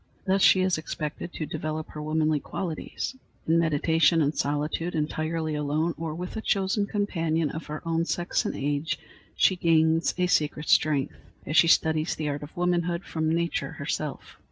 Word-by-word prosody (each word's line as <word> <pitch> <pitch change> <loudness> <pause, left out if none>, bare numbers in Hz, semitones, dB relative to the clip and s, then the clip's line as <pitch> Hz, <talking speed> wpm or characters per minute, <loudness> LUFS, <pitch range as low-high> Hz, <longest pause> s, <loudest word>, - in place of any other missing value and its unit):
Thus 195 0 +2
she 190 - +6
is 185 -3 +1
expected 155 +2 -5
to 155 - -3
develop 155 +1 -4
her 150 - -7
womanly 155 0 +1
qualities. 170 - -4 0.3
In 165 +1 +4
meditation 165 +1 +3
and 145 +2 0
solitude, 150 +4 -1
entirely 155 +1 -1
alone 150 +3 0
or 160 0 -4
with 180 +2 -6
a 220 - -3
chosen 200 0 +1
companion 165 -7 0
of 160 - -7
her 150 +2 -6
own 165 0 +1
sex 175 0 0
and - - -3
age, 145 +3 -1 0.4
she 190 - +4
gains 165 -1 +3
a 180 - +2
secret 150 -3 0
strength, 145 -3 +3 0.3
as 155 - -3
she 165 - +7
studies 160 -1 +3
the 155 -1 -2
art 145 0 -3
of 145 +3 -10
womanhood 175 0 0
from 160 -1 -1
nature 170 +1 -1
herself. - - -4
160 Hz, 170 wpm, -27 LUFS, 155-170 Hz, 0.4 s, she